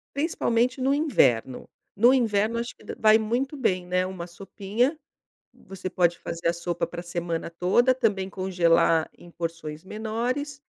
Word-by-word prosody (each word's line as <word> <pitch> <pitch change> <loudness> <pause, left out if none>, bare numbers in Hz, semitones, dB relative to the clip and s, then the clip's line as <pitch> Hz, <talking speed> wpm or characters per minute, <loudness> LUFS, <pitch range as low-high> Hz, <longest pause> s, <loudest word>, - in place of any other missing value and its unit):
Principalmente 255 -4 0
no 270 +2 +2
inverno. 130 - +1 0.3
No 240 +5 +6
inverno, 225 -2 +1
acho 235 - -5
que - - -19
da - - -6
vai 215 0 +5
muito 245 +6 -2
bem, 185 -9 0
né, 180 +1 0
uma 180 -2 -7
sopinha. 205 - -2 0.6
Você 190 -1 -8
pode 175 -2 +2
fazer 170 0 -6
a 170 - +4
sopa 170 0 -3
pra 175 0 -7
semana 175 -1 -4
toda, 185 +9 +3
também 210 -7 0
congelar 170 -4 +2
em 175 - -14
porções 165 -2 -6
menores. 245 +7 -3
195 Hz, 150 wpm, -25 LUFS, 175-240 Hz, 0.6 s, No